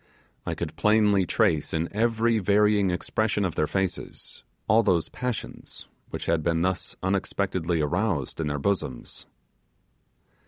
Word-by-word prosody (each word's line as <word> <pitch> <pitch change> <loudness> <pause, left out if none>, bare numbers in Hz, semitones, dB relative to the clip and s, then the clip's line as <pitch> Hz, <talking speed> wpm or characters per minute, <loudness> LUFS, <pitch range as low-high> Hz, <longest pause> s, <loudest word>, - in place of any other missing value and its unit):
I - - -1
could - - -5
plainly 105 -3 +3
trace, 85 -9 +1
in 80 +1 0
every 115 0 +2
varying 105 0 +3
expression 100 +3 0
of 90 - -2
their 75 - 0
faces, 95 +1 -3 0.2
all 110 +1 +5
those 90 -7 +1
passions 125 -2 -5 0.2
which - - -5
had 80 -1 +1
been 85 +1 +1
thus 95 0 -2
unexpectedly 95 -3 0
aroused 75 - -1
in 80 - -1
their 75 0 -1
bosoms. 70 -7 -3
95 Hz, 130 wpm, -26 LUFS, 80-105 Hz, 0.2 s, all